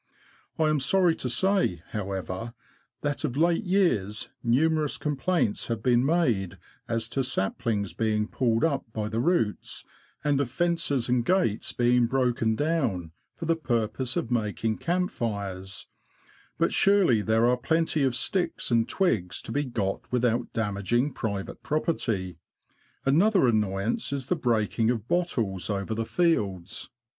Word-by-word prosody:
I 160 - +2
am 155 -1 +2
sorry 175 +5 +3
to 125 - -2
say, 180 - +1
how 100 -3 -4
ever, 95 +5 -5 0.5
that 145 0 -2
of 135 -3 -2
late 170 +5 +2
years 125 - +1
numerous 150 +5 +2
complaints 150 - 0
have 115 -2 -3
been 120 -1 +4
made 130 - +1 0.3
as 115 -1 -1
to 135 - 0
saplings 105 -3 -1
being 105 -1 0
pulled 115 -2 +1
up 150 -4 +1
by 105 -1 -2
the 110 +1 -2
roots, 125 - 0 0.4
and 145 -2 +2
of 135 - -2
fences 165 -4 0
and 125 -1 +2
gates 150 - +1
being 120 0 +3
broken 120 -3 +1
down, 125 - -1 0.2
for 165 - -6
the 165 0 +2
purpose 120 -3 -1
of 120 - -2
making 110 -1 -1
camp 180 +3 0
fires; 100 - -4 0.7
but - - +1
surely 195 - +4
there 110 +2 +2
are 125 +1 +4
plenty 160 +4 0
of 130 -3 +2
sticks 180 0 -1
and 115 -1 +2
twigs 110 - 0
to - - -7
be 145 +4 0
got 105 -6 -3
without 120 -1 +1
damaging 115 +5 0
private 100 -5 -4
property. 110 - -1 0.7
Another 180 +6 +4
annoyance 105 -1 0
is 140 -2 -4
the 180 - +3
break 115 - 0
ing 115 0 +4
of 115 -2 -1
bottles 115 - 0
over 100 +1 -2
the 115 +1 -2
fields. 105 - 0
120 Hz, 150 wpm, -27 LUFS, 105-155 Hz, 0.7 s, been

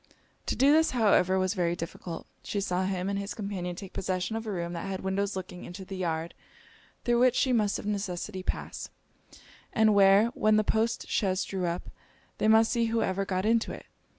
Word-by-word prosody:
To - - 0
do 275 +3 +5
this, 320 +1 +4
however, 190 -4 +4
was 185 0 +1
very 175 -4 0
difficult. 165 0 -6 0.2
She 205 - -3
saw 185 -1 0
him 185 -1 -2
and 200 0 -1
his 200 +1 -5
companion 195 -5 -4
take 190 +1 -9
possession 185 +3 -2
of 225 0 -4
a - - -2
room 170 -2 -3
that 170 +3 -4
had 190 -1 -4
windows 195 +1 -1
looking 180 -1 -6
into 190 +2 -8
the 195 - -7
yard 165 -2 -2 0.7
through 240 0 +3
which 255 0 +4
she 260 -1 +2
must 210 -4 +2
of - - -8
necessity 195 -1 -3
pass, - - -4 0.8
and 220 -1 +4
where, 200 +2 +6
when 215 -3 +2
the 215 - +3
post 225 +2 0
chaise 185 -3 0
drew 185 -1 -2
up, 170 +1 -4 0.5
they - - +2
must 220 +1 +5
see 235 -2 +2
whoever 200 -4 0
got 185 0 -1
into 230 +1 +2
it. - - -10
195 Hz, 200 wpm, -28 LUFS, 185-220 Hz, 0.8 s, where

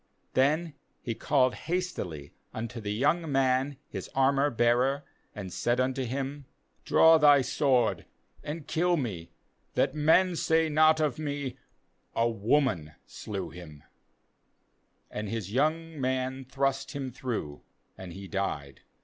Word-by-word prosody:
MThen 150 +5 +2 0.3
he 115 - -2
called 130 +1 +2
hastily 150 - -4 0.2
unto 115 +1 -5
the 105 -1 -3
young 150 +8 +1
man 135 +1 +1
his - - -7
armour 135 +2 +3
bearer, 125 +3 +2 0.3
and 95 -4 -6
said 120 +1 0
unto 130 0 0
him: 135 +3 -4 0.4
Draw 160 0 +6
thy 145 -2 +7
sword, 120 - +1 0.4
and 150 0 -5
kill 175 +3 +1
me, 100 - -4 0.5
that - - +2
men 165 +4 +4
say 160 0 +2
not 155 +1 +5
of 150 -3 0
me: 145 -4 -3 0.6
A 115 - +3
woman 115 - +1
slew - - -6
him/ 80 -4 -11 1.3
And 105 -1 -4
his 105 -3 -4
young 155 +3 0
man 130 0 -1
thrust 135 +1 -1
him 135 -3 -4
through, 115 - -4 0.3
and 95 -2 -9
he 95 +3 -9
died. 75 -9 -3
130 Hz, 130 wpm, -29 LUFS, 115-150 Hz, 1.3 s, thy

